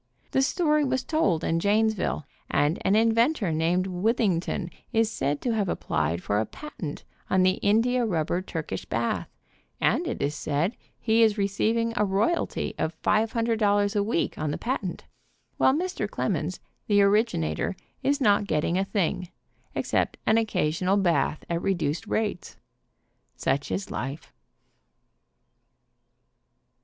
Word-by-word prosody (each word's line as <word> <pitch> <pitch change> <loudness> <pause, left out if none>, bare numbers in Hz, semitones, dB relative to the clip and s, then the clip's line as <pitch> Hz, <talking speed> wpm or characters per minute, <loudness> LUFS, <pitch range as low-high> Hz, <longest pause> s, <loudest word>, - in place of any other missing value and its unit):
The 265 - +3
story 300 +1 +2
was 260 -2 0
told 195 - +1
in 165 - +1
Janesville, 210 -5 +1 0.2
and 150 +4 +1
an 195 - +3
inventor 230 - +3
named 165 +4 +1
Withington 185 -2 0 0.2
is 225 -2 +2
said 145 -4 -1
to 245 - 0
have 205 -4 0
applied 80 - -1
for 105 - +1
a 110 - 0
patent 180 - -7 0.3
on 185 0 +3
the 185 +1 +2
india 235 +5 +3
rubber 175 -4 0
Turkish 160 - -5
bath, 115 0 -2 0.5
and - - +2
it - - -3
is 145 - 0
said 155 - -1 0.2
he 225 0 +3
is 220 -1 +4
receiving 220 +3 +1
a 210 - +2
royalty 210 - 0
of 160 0 -2
$500 215 -2 +2
a 205 - +3
week 200 -4 -1
on 155 0 -1
the 145 - -2
patent, 230 -7 -3 0.5
while - - +5
Mr. 360 +6 -2
demons, - - -2 0.3
the 205 -1 +4
originator, 200 - +1 0.3
is 285 +1 +1
not 205 -5 +3
getting 170 +2 +1
a - - +2
thing, 185 -3 -1 0.5
except - - 0
an 220 +1 +4
occasional 185 -3 +1
bath 170 -6 +1
at 170 0 -1
re 195 0 +1
duced 165 +4 -2
rates. 215 -5 -2 0.8
Such 140 +1 -1
is 190 - -3
life. 135 +5 -5
200 Hz, 140 wpm, -26 LUFS, 165-225 Hz, 0.8 s, while